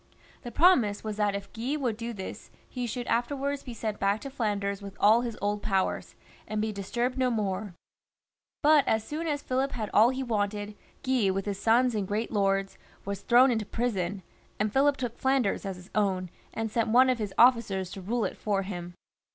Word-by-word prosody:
The 240 - -7
promise 240 - +4
was 215 -1 -4
that 205 -1 +1
if 200 0 -7
Guy 245 +6 -2
would 250 -7 -1
do 230 +1 -5
this, 190 -4 -8 0.2
he 250 -2 -4
should 240 +2 -4
afterwards 275 +4 -1
be 245 -3 -8
sent 215 -2 -3
back 200 +2 +1
to 275 - -7
Flanders 205 -5 -2
with 200 -1 -9
all 220 +3 +5
his 235 -3 -4
old 205 0 0
powers, 195 -3 -1 0.3
and 215 - -2
be 215 +1 0
disturbed 240 +6 -2
no 255 -1 +3
more; 200 -4 -2 0.9
but 300 -1 +6
as 220 -1 +2
soon 315 +7 -4
as 290 -2 -2
Philip 265 +2 -1
had 215 -4 -4
all 220 +3 +6
he 260 +1 -2
wanted, 205 -3 -2 0.3
Guy 255 -6 +2
with 195 0 -1
his 200 -2 -3
sons 240 +2 +3
and 205 -3 -2
great 215 +3 -2
lords 195 -2 0 0.3
was 200 0 -4
thrown 250 +2 +5
into 225 -2 0
prison, 200 -5 -2 0.4
and 215 0 0
Philip 280 +1 +3
took 245 -2 -4
Flanders 265 -7 +1
as 190 - -4
his 180 +1 -14
own, 190 -4 0 0.2
and 225 -1 -3
sent 230 0 0
one 250 +4 +6
of 255 -2 +1
his 205 -3 -4
officers 230 -7 +4
to 195 - -7
rule 220 +4 -1
it - - -4
for 200 -2 -1
him. 175 -2 -6
220 Hz, 200 wpm, -28 LUFS, 200-245 Hz, 0.9 s, but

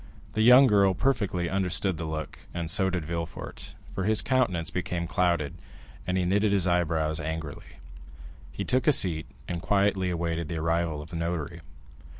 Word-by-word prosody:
The 110 - 0
young 125 +4 +8
girl 100 -5 +4
perfectly 100 -10 0
understood 95 -1 0
the 80 - -4
look, 80 0 -6
and 85 -2 -1
so 95 +2 +3
did 90 -4 -3
Villefort, 85 0 -6 0.2
for 95 - -3
his 110 0 +3
countenance 90 - 0
became 90 -1 -2
clouded, 85 -4 0 0.5
and 90 0 0
he 90 - +1
knitted 100 +3 +2
his 100 -3 +2
eyebrows 80 -3 +1
angrily. 80 -5 -6 0.7
He 100 - -4
took 130 +3 +1
a 150 - +7
seat, 80 - +3 0.2
and 85 -1 -4
quietly 100 -1 +1
awaited 85 -1 -2
the 80 - -4
arrival 80 -1 -1
of 75 - -14
the 85 - -4
notary. 85 -3 -3
85 Hz, 165 wpm, -27 LUFS, 80-95 Hz, 0.7 s, young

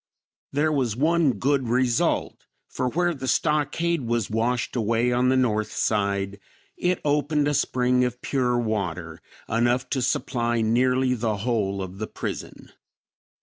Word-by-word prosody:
There 150 +3 +1
was 130 -7 0
one 155 +1 +3
good 135 -2 0
result, 125 -1 0 0.2
for 125 - -2
where 175 +5 +1
the 135 -3 -6
stockade 155 +3 +1
was 120 -4 -1
washed 115 +3 -1
away 115 +1 +1
on 125 +1 +2
the 130 - +3
north 110 -4 +1
side, 100 -2 -1 0.4
it 180 0 0
opened 150 0 +1
a 145 - +1
spring 125 -2 +2
of 125 0 -2
pure 125 -3 +1
water, 105 -8 -3 0.3
enough 120 +3 +1
to 130 - 0
supply 120 -2 0
nearly 125 +3 +2
the 110 -3 -1
whole 100 -5 0
of 95 +1 -8
the 110 - -3
prison." - - -7
125 Hz, 145 wpm, -25 LUFS, 115-135 Hz, 0.4 s, one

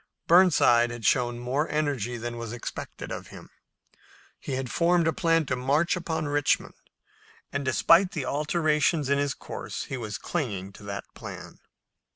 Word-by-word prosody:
Burnside 155 -9 +5
had 120 -2 -7
shown 120 0 +2
more 130 +6 -1
energy 140 -6 -1
than 120 0 -5
was 115 -1 -5
expected 120 - -7
of - - -6
him. - - -13 0.9
He 135 - -5
had 130 -2 -3
formed 170 -1 +3
a 160 - +2
plan 165 -2 +2
to 130 - -1
march 140 +8 +1
upon 160 -3 -3
Richmond, 145 -1 +1 0.8
and, - - -1
despite 170 +8 +4
the 150 -6 -3
alterations 150 0 +1
in 140 0 +3
his 145 -1 0
course, - - -6
he 135 - -5
was 105 -4 -5
clinging 100 - -3
to 105 - -14
that 100 0 -5
plan. - - -9
140 Hz, 160 wpm, -27 LUFS, 120-160 Hz, 0.9 s, Burnside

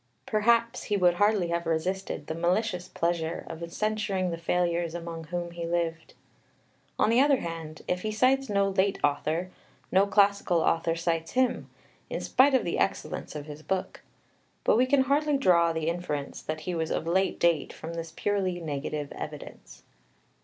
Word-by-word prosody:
Perhaps 230 +2 +2
he 205 - 0
would 180 -2 +4
hardly 205 -1 +2
have 170 0 -1
resisted 165 -1 -2
the 160 - -4
malicious 180 +2 0
pleasure 170 -1 -2
of 170 +1 -7
censuring 210 -4 -1
the 165 - -3
failures 170 0 0
among 165 -1 -6
whom 175 +1 -4
he 170 -1 -5
lived. 165 -1 -2 0.8
On 215 - +3
the 240 +3 +5
other 280 -1 +4
hand, 165 -2 -6
if 180 0 -1
he 215 - -2
cites 260 +5 +2
no 200 -1 +2
late 195 0 +1
author, 155 +5 0 0.4
no 195 +2 +4
classical 200 -4 +3
author 165 0 +1
cites 165 -1 -2
him, 255 -1 +1 0.4
in - - -3
spite 270 +1 +4
of 260 - +2
the 170 - -1
excellence 195 - -2
of 145 -1 -5
his 150 0 -9
book. 190 +3 -3 0.6
But - - +4
we 250 +3 +4
can 280 0 +4
hardly 290 +2 +2
draw 170 -9 +4
the 160 -1 -2
inference 165 -5 -3
that 155 0 -4
he 180 +3 -3
was 160 -1 -1
of - - -1
late 190 +3 +1
date 170 -4 +2
from 165 +1 -8
this 165 -1 -5
purely 185 0 -1
negative 150 -2 -4
evidence. - - -9
175 Hz, 170 wpm, -28 LUFS, 165-205 Hz, 0.8 s, the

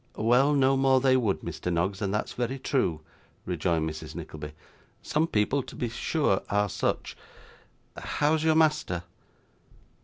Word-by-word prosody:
'Well, 125 +6 +3
no 135 -1 +4
more 135 -1 +4
they 130 0 +4
would, 105 -10 +1
Mr. 90 - -4
Noggs, 90 +4 -1
and 100 -2 -1
that's 105 - -2
very 125 +2 -2
true,' 95 - 0 0.4
rejoined 85 -2 0
Mrs 80 0 -7
Nickleby. 75 -1 -7 0.5
'Some 155 +2 +1
people 120 +3 +1
to - - -11
be 120 - -2
sure 130 - 0
are 105 0 +1
such - - -2 0.8
how's 155 +1 0
your 160 -1 +3
master? 150 - +2
120 Hz, 145 wpm, -27 LUFS, 90-135 Hz, 0.8 s, no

